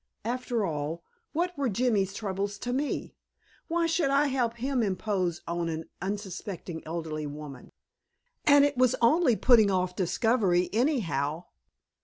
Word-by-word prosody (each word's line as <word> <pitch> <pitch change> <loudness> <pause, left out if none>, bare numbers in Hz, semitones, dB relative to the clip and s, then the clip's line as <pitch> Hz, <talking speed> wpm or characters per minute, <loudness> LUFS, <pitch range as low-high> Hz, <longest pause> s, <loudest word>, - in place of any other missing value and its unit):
After 240 -2 -1
all, 160 0 -3 0.3
what 355 +3 -1
were 280 -4 0
Jimmy's 210 -3 +1
troubles 200 -1 -3
to 245 +4 -3
me? 280 +3 -2 0.5
Why 335 0 +1
should 325 -3 +1
I 280 +1 +3
help 245 -3 0
him 255 +2 -1
impose 185 -4 -1
on 170 0 -1
an 160 0 -5
unsuspecting 190 -3 -5
elderly 160 -2 -4
woman? 145 -3 -9 0.7
And 285 -1 +6
it 285 0 0
was 255 0 +3
only 255 +1 +4
putting 225 -3 +5
off 185 -1 0
discovery 190 -1 +1
anyhow. 175 - 0
205 Hz, 135 wpm, -28 LUFS, 175-255 Hz, 0.7 s, And